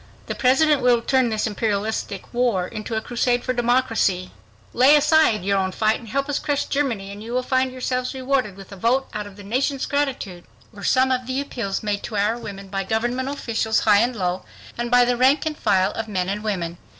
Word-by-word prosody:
"The - - -3
President 270 +3 +3
will 245 -2 +3
turn 260 -2 +2
this 215 -1 -1
Imperialistic 210 -1 -2
war 240 -7 +1
into 215 +2 -5
a 220 - 0
crusade 245 +1 0
for 255 - -1
democracy."... 235 -7 +1 0.4
"Lay 265 +4 +6
aside 300 - +4
your 200 0 +2
own 190 0 -1
fight 215 +3 +1
and 230 - -13
help 275 +4 -1
us 290 - -1
crush 285 -1 -1
Germany, 235 -9 -2
and 200 +1 -9
you 230 +2 -7
will 255 0 0
find 260 0 +1
yourselves 255 0 -3
rewarded 260 -6 -1
with 195 0 -12
a - - -7
vote 245 +7 +1
out 210 -1 -4
of 200 - -13
the 205 - -12
nation's 260 +6 -1
gratitude," 260 -11 -2 0.3
were 200 -1 -11
some 260 +3 +3
of 255 -1 -1
the 260 +1 -1
appeals 230 -9 -3
made 205 -1 -1
to 215 - -5
our 210 +3 +2
women 200 -4 -8
by 195 0 -2
government 240 +6 -1
officials 225 -5 -1
high 205 -2 +5
and 240 +3 +1
low 185 -2 -2 0.3
and 240 0 -3
by 245 0 +5
the 245 0 +1
rank 265 +5 +3
and 310 -1 -2
file 185 0 +2
of 225 0 -5
men 185 -3 -2
and 205 +2 -3
women. 175 -5 -3
235 Hz, 215 wpm, -22 LUFS, 205-260 Hz, 0.4 s, Lay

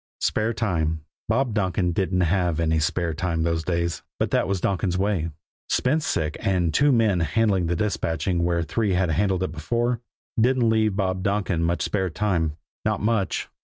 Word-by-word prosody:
Spare 110 +2 +1
time! 80 -8 -1 0.3
Bob 130 -4 +1
Donkin 95 -3 +1
didn't 90 +1 0
have 90 -1 +1
any 80 -1 +2
spare 85 +2 0
time 80 0 -1
those 80 -1 0
days! 85 -1 -1 0.2
But - - -1
that - - +2
was 95 -1 0
Donkin's 90 -1 0
way. 95 -4 0 0.4
Spence 155 +4 +1
sick, 75 -1 -1
and 90 -6 +1
two 145 0 +4
men 110 -7 +3
handling 95 +2 +1
the 85 - 0
dispatching 85 -2 -1
where 85 -1 +1
three 100 +5 0
had 90 -2 +1
handled 95 +2 +1
it 95 - -2
before, 120 +9 -1 0.4
didn't 125 +1 +3
leave 110 -2 +2
Bob 95 -2 -1
Donkin 100 -3 0
much 85 +1 0
spare 95 -3 0
time 80 -4 -1 0.3
not - - 0
much. 105 -3 0
95 Hz, 170 wpm, -24 LUFS, 85-105 Hz, 0.4 s, two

